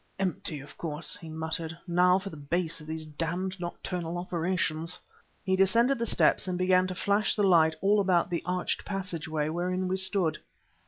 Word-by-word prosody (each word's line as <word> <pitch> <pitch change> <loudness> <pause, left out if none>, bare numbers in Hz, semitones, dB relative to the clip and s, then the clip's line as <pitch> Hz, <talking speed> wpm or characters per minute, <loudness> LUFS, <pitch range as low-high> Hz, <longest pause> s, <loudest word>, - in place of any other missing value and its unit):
"Empty, 175 -5 -1
of 145 - -13
course!" 155 -1 +1
he 165 -5 -10
muttered. 160 +1 -1
"Now 180 +1 +4
for 195 0 -6
the - - -9
base 165 +3 -2
of 150 - -12
these 160 0 -4
damned 175 +5 -3
nocturnal 175 -1 -4
operations." 170 -1 -1 0.5
He 190 0 +1
descended 230 +7 +3
the 235 - -1
steps - - +3
and 180 -1 -1
began 185 0 +3
to 185 - -5
flash 200 +2 +1
the 210 - +1
light 160 -4 +5
all 205 +2 +4
about 180 -3 +2
the 170 - -1
arched 180 0 -2
passageway 165 -6 -3
wherein 180 +3 -1
we 185 +1 0
stood. 190 -4 +1
180 Hz, 175 wpm, -28 LUFS, 160-190 Hz, 0.5 s, light